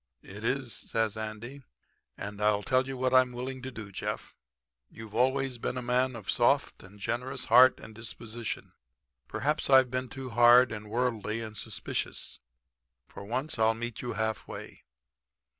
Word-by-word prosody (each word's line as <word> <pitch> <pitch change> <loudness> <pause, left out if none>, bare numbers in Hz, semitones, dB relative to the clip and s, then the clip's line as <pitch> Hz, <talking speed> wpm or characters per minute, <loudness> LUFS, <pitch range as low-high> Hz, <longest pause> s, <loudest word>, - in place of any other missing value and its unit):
"'It 105 +3 -10
is,' 125 0 -1
says 110 -2 -1
Andy, 110 +5 -6 0.6
'and 100 +1 -6
I 105 -1 +3
tell 130 +5 +2
you 135 -1 -4
what 130 0 0
I'm 130 -1 +5
willing 130 +2 -5
to 130 - -5
do, 110 -5 -8
Jeff. - - -5 0.5
You've 110 -2 -11
always 130 +1 +1
been 125 - -2
a 125 - -3
man 125 +1 +1
of 110 -4 -9
a - - +2
soft - - +2
and 100 +2 -14
generous 125 +5 -3
heart 125 +3 +7
and 110 - -11
disposition. 115 0 -6 0.6
Perhaps 150 - -1
I've 130 -2 +6
been 130 0 -2
too 130 -1 -7
hard 120 +1 +7
and 105 -1 -6
worldly 115 -2 -1
and 110 -1 -7
suspicious. 95 - -4 0.7
For - - -9
once 125 +6 -2
I'll 110 0 +4
meet 120 0 -5
you 120 - -3
half 110 +1 -2
way. - - -8
120 Hz, 165 wpm, -30 LUFS, 110-130 Hz, 0.7 s, heart